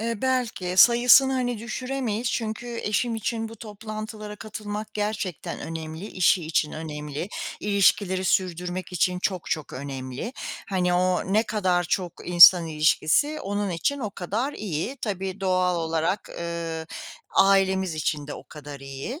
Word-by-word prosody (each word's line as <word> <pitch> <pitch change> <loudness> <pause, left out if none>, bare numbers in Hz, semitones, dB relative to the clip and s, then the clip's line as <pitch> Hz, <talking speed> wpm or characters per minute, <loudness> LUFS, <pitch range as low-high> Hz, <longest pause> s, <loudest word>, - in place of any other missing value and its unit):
Eee, 230 +1 -1
belki, 235 -9 -1
sayısını 245 +4 +7
hani 245 -3 -1
düşüremeyiz 240 0 -3
çünkü 230 +1 -3
eşim 230 +3 0
için 225 0 -2
bu 225 - -11
toplantılara 215 0 -7
katılmak 210 0 -6
gerçekten 210 -5 -3
önemli, 160 +3 -6
işi 180 -3 +2
için 160 -1 0
önemli, 150 +1 -5 0.3
ilişkileri 195 -2 +2
sürdürmek 180 -2 -1
için 180 +1 +1
çok 185 -2 -2
çok 155 -2 -2
önemli. 135 - -5 0.4
Hani, 180 -2 +1
o 185 +1 +1
ne 215 +2 +4
kadar 185 -5 0
çok 175 0 -1 0.2
insan 175 -1 +9
ilişkisi, 160 - +2
onun 205 0 -2
için 280 - -1
o 215 -5 -3
kadar 215 +10 -3
iyi. 205 - -4
Tabii 195 -2 -3
doğal 185 -1 +2
olarak, 165 +4 -1
ııı, 165 -1 -4 0.5
ailemiz 190 -3 +3
için 150 -1 -2
de 145 - -6
o - - -10
kadar 145 -2 -10
iyi. 135 - -6
190 Hz, 135 wpm, -25 LUFS, 170-220 Hz, 0.5 s, insan